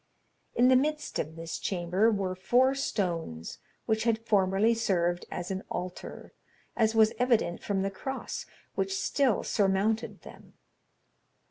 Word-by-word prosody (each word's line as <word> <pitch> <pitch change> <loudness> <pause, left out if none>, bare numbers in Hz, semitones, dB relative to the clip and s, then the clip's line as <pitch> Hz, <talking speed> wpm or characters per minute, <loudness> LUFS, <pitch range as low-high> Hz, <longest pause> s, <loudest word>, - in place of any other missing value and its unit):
In 250 +1 +5
the 260 - +6
midst 300 +4 0
of 155 +2 -3
this 165 0 -5
chamber 185 +4 +1
were 195 -3 -1
four 245 +8 +3
stones, 170 - -3 0.3
which 220 0 +1
had 225 -1 0
formerly 200 +1 +3
served 175 -6 0
as 175 +2 -5
an 190 0 -2
altar, 180 0 -6 0.4
as 220 -1 +2
was 220 -1 +5
evident 235 -8 +2
from 195 -2 -1
the 195 - -1
cross 265 +7 -5 0.3
which 390 0 -1
still 275 - +1
surmounted 210 +2 0
them. - - -14
205 Hz, 135 wpm, -29 LUFS, 185-235 Hz, 0.4 s, the